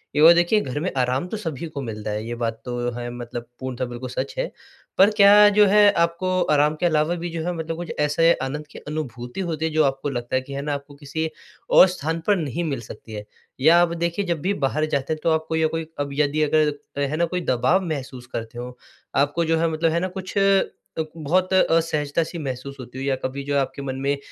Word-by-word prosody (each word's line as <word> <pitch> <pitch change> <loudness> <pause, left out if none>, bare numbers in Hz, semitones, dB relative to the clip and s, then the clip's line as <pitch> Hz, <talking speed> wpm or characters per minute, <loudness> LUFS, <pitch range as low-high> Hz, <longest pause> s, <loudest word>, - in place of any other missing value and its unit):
एक 150 - +4
ओर 170 +2 +10
देखिए 175 +5 +3
घर 130 +2 -4
में 185 +5 -2
आराम 130 +6 0
तो 220 - -4
सभी 165 -6 -5
को 145 -3 -6
मिलता 110 -3 -5
है 105 +1 -3
ये 120 - -3
बात 115 -1 -3
तो 120 0 -4 0.2
है 120 0 -4
मतलब 120 -1 -7
पूर्णतः 130 -1 -3
बिल्कुल 120 +1 -6
सच 455 - -3
है। - - -2 0.5
पर 195 +2 +7
क्या 205 +1 +8
जो 210 0 +5
है 205 +1 +6
आपको 175 +2 +1
आराम 150 +1 +3
के - - 0
अलावा 160 +1 +2
भी 175 0 -4
जो 165 -1 -4
है 180 - -1
मतलब 165 0 -4
कुछ 175 0 -5
ऐसे 165 +3 +4
आनंद 150 +3 -4
की - - -11
अनुभूति 130 -2 -5
होती 160 -1 -2
है 160 - -1
जो 155 0 +3
आपको 135 +1 -1
लगता 120 -1 -3
है 130 - +2
कि 140 +2 -10
है 140 - -3
ना 145 0 -2
आपको 140 0 -7
किसी 155 +3 -3 0.4
और 190 - +8
स्थान 165 -2 -3
पर 205 - +5
नहीं 155 +1 -2
मिल 140 -7 -2
सकती 110 0 -11
है। 105 -1 -6 0.4
या 165 +4 +6
आप 170 -1 +2
देखिए 170 +4 -1
जब 170 -4 -2
भी 195 +5 0
बाहर 155 +3 0
जाते 140 +2 -1
हैं 155 - -6
तो 165 - +3
आपको 160 0 0
या 160 0 +3
कोई 165 0 -4
अब 145 0 -1
यदि 150 +1 +1
अगर 155 +1 +3 0.3
अ, - - -1
है 140 +2 0
ना 170 - +3
कोई 180 +2 -3
दबाव 170 +7 +2
महसूस 130 -6 -5
करते 115 +1 -5
हो, 125 0 -7 0.4
आपको 145 +5 +2
जो 165 0 +2
है 165 - +2
मतलब 160 +1 +1
है 170 - +1
ना 185 - -1
कुछ 190 +1 -6
अ, 195 -1 +4 0.5
बहुत 180 +5 +1
असहजता 165 -4 +2
सी 165 +2 -7
महसूस 135 -1 -5
होती 125 0 -9
हो 135 - -4
या 135 -1 +1
कभी 135 +2 -3
जो 145 +1 -2
है 140 - +4
आपके 135 +1 -4
मन 130 -1 -4
में 140 +1 0
150 Hz, 245 wpm, -23 LUFS, 130-170 Hz, 0.5 s, ओर